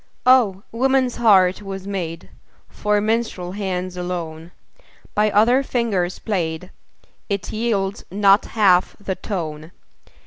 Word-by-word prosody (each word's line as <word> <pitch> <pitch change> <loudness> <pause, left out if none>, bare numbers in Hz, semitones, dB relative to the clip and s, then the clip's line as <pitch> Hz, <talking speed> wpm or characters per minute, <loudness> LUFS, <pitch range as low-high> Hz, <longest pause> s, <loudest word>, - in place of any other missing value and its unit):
Oh! 230 -7 +4
woman's 260 +1 +1
heart 195 -5 +4
was 195 -1 -7
made 175 -4 -5 0.4
For 210 0 0
minstrel 215 -4 -1
hands 185 -2 -3
alone; 170 -2 -5 0.6
By 210 +1 +2
other 230 +6 +4
fingers 215 -9 -1
played, 180 -4 -3 0.6
It 200 -1 -3
yields 215 -3 -1
not 200 +1 +4
half 190 -5 +3
the 200 -2 -3
tone. 160 -5 -5
195 Hz, 110 wpm, -21 LUFS, 180-215 Hz, 0.6 s, Oh